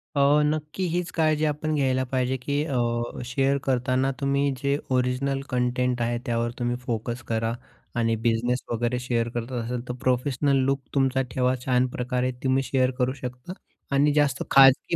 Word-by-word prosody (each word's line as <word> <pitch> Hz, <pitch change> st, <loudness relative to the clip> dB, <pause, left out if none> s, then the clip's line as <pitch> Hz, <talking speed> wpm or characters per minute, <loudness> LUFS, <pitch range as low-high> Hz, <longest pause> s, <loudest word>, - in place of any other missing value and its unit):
अ, -, -, +1 dB, 0.3 s
नक्की 155 Hz, +4 st, -2 dB
हीच 175 Hz, 0 st, -2 dB
काळजी 155 Hz, -1 st, +2 dB
आपण 155 Hz, +1 st, -1 dB
घ्यायला 130 Hz, -2 st, +1 dB
पाहिजे, 130 Hz, 0 st, 0 dB
की 145 Hz, +3 st, -1 dB
अ, 135 Hz, -5 st, -2 dB, 0.5 s
शेअर 135 Hz, +2 st, +1 dB
करतांना 130 Hz, +1 st, +1 dB
तुम्ही 140 Hz, 0 st, +1 dB
जे 140 Hz, +1 st, 0 dB
ओरिजिनल 130 Hz, +2 st, 0 dB
कंटेंट 125 Hz, -1 st, 0 dB
आहे 120 Hz, 0 st, 0 dB
त्यावर 115 Hz, 0 st, 0 dB
तुम्ही 120 Hz, 0 st, 0 dB
फोकस 120 Hz, 0 st, -4 dB
करा 115 Hz, 0 st, 0 dB, 0.5 s
आणि 115 Hz, -1 st, +2 dB
बिझनेस 120 Hz, +2 st, +1 dB
वगैरे 120 Hz, +2 st, 0 dB
शेअर 120 Hz, -2 st, -1 dB
करत 120 Hz, +1 st, -5 dB
असाल 120 Hz, 0 st, -3 dB
तर 125 Hz, -, -3 dB
प्रोफेशनल 130 Hz, +2 st, +1 dB
लूक 135 Hz, 0 st, 0 dB
तुमचा 135 Hz, -1 st, +2 dB
ठेवा 130 Hz, 0 st, +1 dB
छान 125 Hz, 0 st, +2 dB
प्रकारे 125 Hz, +1 st, -1 dB
तुम्ही 135 Hz, 0 st, +2 dB
शेअर 130 Hz, -1 st, +1 dB
करू 130 Hz, 0 st, +1 dB
शकता 125 Hz, +5 st, -7 dB, 0.4 s
आणि 145 Hz, +1 st, +4 dB
जास्त 145 Hz, -4 st, +2 dB
खाजगी 135 Hz, +4 st, +6 dB
130 Hz, 160 wpm, -25 LUFS, 125-140 Hz, 0.5 s, खाजगी